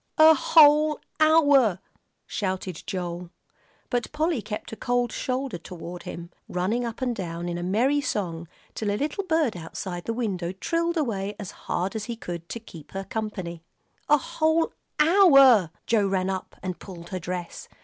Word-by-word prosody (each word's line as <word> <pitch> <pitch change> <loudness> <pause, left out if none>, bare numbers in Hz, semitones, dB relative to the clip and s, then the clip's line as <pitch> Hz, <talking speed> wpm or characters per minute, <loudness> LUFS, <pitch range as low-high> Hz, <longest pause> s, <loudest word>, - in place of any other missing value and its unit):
"A 315 0 +9
whole 300 0 +5 0.2
hour," 285 - +5 0.5
shouted 185 -3 -3
Joel. 175 -1 -4 0.6
But 245 -1 -1
Polly 310 -3 0
kept 210 0 -6
a - - -5
cold 245 0 0
shoulder 255 -7 -3
toward 175 +1 -8
him, 170 +1 -8 0.2
running 195 +7 0
up 235 +2 -4
and 245 -2 0
down 175 -3 -4
in 175 0 -3
a - - -4
merry 240 +11 +2
song 170 - -3 0.3
till 215 - -2
a 205 - 0
little 305 - -2
bird 320 - +1
outside 175 +1 -6
the 230 - -1
window 190 -7 -2
trilled 335 - -1
away 210 -8 -1
as 205 -4 -7
hard 185 +4 -3
as 215 -1 -3
he 235 - -4
could, 170 -6 -7
to 235 - -5
keep 165 -9 -13
her 195 0 -3
company. 195 -5 -5 0.5
"A 295 - +7
whole 315 +3 +1 0.3
hour 275 - +7
" - - -48
Joel 215 -4 +2
ran 190 0 0
up 190 -1 -5
and 185 -1 -4
pulled 170 -3 -10
her 185 - -3
dress. 175 0 -5
210 Hz, 170 wpm, -26 LUFS, 180-275 Hz, 0.6 s, A